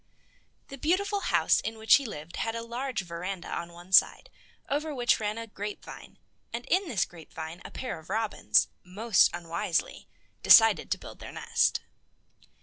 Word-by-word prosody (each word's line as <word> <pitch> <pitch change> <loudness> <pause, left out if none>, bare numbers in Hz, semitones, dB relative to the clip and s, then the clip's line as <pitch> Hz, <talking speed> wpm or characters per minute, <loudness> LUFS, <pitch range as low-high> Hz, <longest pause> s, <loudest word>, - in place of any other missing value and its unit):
The 275 - -9
beautiful 400 +7 +1
house - - +2
in 225 0 -5
which 220 0 +6
he 275 -3 -5
lived 155 -4 -8
had 225 0 -2
a 230 - -4
large 245 +1 -3
veranda 175 +1 -6
on 170 0 -5
one 175 +2 -14
side, 190 - +4 0.4
over 295 +1 -2
which 245 -2 +2
ran 210 0 -2
a 230 - -5
grapevine, 210 -1 -8 0.3
and 235 +1 -5
in 370 +1 +2
this 190 - +1
grapevine 160 0 -9
a - - -8
pair 255 -10 -6
of 160 - -17
robins, 220 -1 +2 0.2
most 205 +4 +3
unwisely, 170 0 -3 0.3
decided - - +6
to - - 0
build - - -12
their - - -9
nest. - - +1
220 Hz, 160 wpm, -28 LUFS, 175-250 Hz, 0.4 s, which